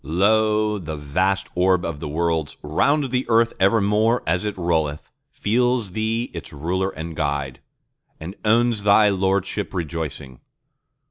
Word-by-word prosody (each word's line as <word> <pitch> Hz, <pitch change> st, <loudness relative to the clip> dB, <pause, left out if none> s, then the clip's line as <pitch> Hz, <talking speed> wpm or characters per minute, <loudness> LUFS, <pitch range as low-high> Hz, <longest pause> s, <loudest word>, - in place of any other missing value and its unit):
Lo, 105 Hz, +6 st, +2 dB
the 80 Hz, -3 st, -6 dB
vast 95 Hz, +7 st, 0 dB
orb 90 Hz, 0 st, +2 dB
of 80 Hz, -3 st, -4 dB
the -, -, -5 dB
Worlds, 80 Hz, -1 st, -1 dB
round 135 Hz, -, +1 dB
the 125 Hz, 0 st, +1 dB
Earth 115 Hz, 0 st, +3 dB
evermore 105 Hz, +3 st, +2 dB
as 90 Hz, +5 st, 0 dB
it 105 Hz, -2 st, -3 dB
rolleth, 80 Hz, -4 st, -1 dB, 0.2 s
Feels 120 Hz, -1 st, 0 dB
Thee 110 Hz, +4 st, -2 dB
its 85 Hz, -, -8 dB
Ruler 90 Hz, +6 st, -2 dB
and 80 Hz, -3 st, -7 dB
Guide, 70 Hz, -3 st, -2 dB, 0.6 s
and 80 Hz, +4 st, -7 dB
owns 115 Hz, 0 st, +2 dB
Thy 105 Hz, +1 st, +5 dB
lordship 95 Hz, +1 st, -1 dB
rejoicing. 75 Hz, -6 st, -5 dB
95 Hz, 135 wpm, -22 LUFS, 80-110 Hz, 0.6 s, Thy